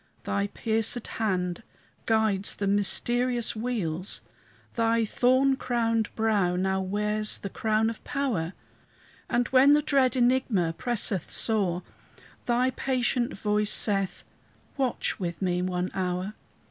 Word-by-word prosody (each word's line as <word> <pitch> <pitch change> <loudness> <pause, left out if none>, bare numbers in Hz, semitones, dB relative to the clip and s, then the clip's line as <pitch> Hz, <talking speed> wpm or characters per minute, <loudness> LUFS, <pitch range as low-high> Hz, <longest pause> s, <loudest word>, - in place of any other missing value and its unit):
Thy 200 0 -1
piercèd 225 +3 0 0.2
hand 180 -4 -1 0.5
guides 220 -3 +1
the 200 - -3
mysterious 240 +5 +2
wheels; 200 -7 -3 0.5
Thy 230 -1 +2
thorn 260 +5 +3
crowned 230 -4 0
brow 210 -5 +1
now 190 +1 0
wears 210 +2 0
the 200 - -7
crown 220 0 +1
of 225 -1 -5
power; 230 - -2 0.8
And 245 0 +1
when 265 +2 +6
the 300 - +4
dread 270 -4 +2
enigma 240 -9 +2
presseth 210 -6 -1
sore, 190 -6 +1 0.6
Thy 250 +2 +2
patient 250 -3 -1
voice 210 0 0
saith, 195 -3 0 0.5
"Watch 260 -5 -1
with 170 -3 -4
me 180 -2 0
one 180 0 -2
hour." 185 +1 -2
220 Hz, 120 wpm, -27 LUFS, 190-245 Hz, 0.8 s, when